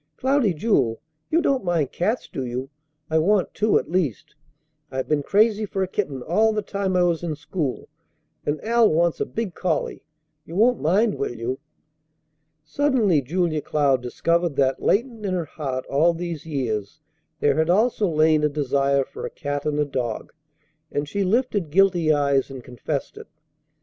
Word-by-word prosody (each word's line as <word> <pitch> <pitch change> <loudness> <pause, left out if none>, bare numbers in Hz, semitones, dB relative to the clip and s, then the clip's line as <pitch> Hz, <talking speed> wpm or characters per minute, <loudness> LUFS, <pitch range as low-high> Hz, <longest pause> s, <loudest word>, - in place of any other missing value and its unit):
Cloudy 265 -5 +2
Jewel, 140 - +1 0.3
you 335 +2 +2
don't 270 -8 +1
mind 170 -6 0
cats, 185 0 -1
do 140 -3 -5
you? 130 +2 -4 0.4
I 160 - +4
want 195 +3 +2
two 215 +1 +3
at - - -2
least. 170 - -1 0.6
I've 130 -1 -3
been 150 -1 +1
crazy 215 +6 +3
for 195 -2 -2
a - - -2
kitten 150 -10 -3
all 215 - +2
the 210 -1 -1
time 195 -2 -2
I 180 - +4
was 170 -2 +1
in 165 -3 -3
school, 145 -2 -4 0.6
and 145 +1 -1
Al 230 0 +4
wants 170 +1 +2
a - - 0
big 220 -5 -4
collie. 165 -3 -2 0.4
You 165 - -10
won't 235 +4 +3
mind, 200 +7 +2
will 120 - -2
you?" 120 +3 -3 1.0
Suddenly 220 - +2
Julia 160 +2 -1
Cloud 140 -4 +1
discovered 170 +6 0
that 135 -1 +1
latent 230 0 0
in 190 -2 -1
her 175 -2 -1
heart 135 -4 -4
all 165 +5 +2
these 170 -2 -5
years 120 -5 -3 0.4
there 145 0 +2
had 160 +1 +2
also 215 +1 +2
lain 155 -1 +3
a 150 - +3
desire 140 -1 +1
for - - -7
a - - -7
cat 145 -1 -4
and 150 -1 0
a 150 - +2
dog; 125 -5 -4 0.6
and 145 0 -2
she 200 +7 -1
lifted 205 - 0
guilty 175 -2 +3
eyes, 140 -2 +2
and 135 -2 -8
confessed 135 +4 -5
it. - - -11
160 Hz, 175 wpm, -23 LUFS, 140-200 Hz, 1.0 s, I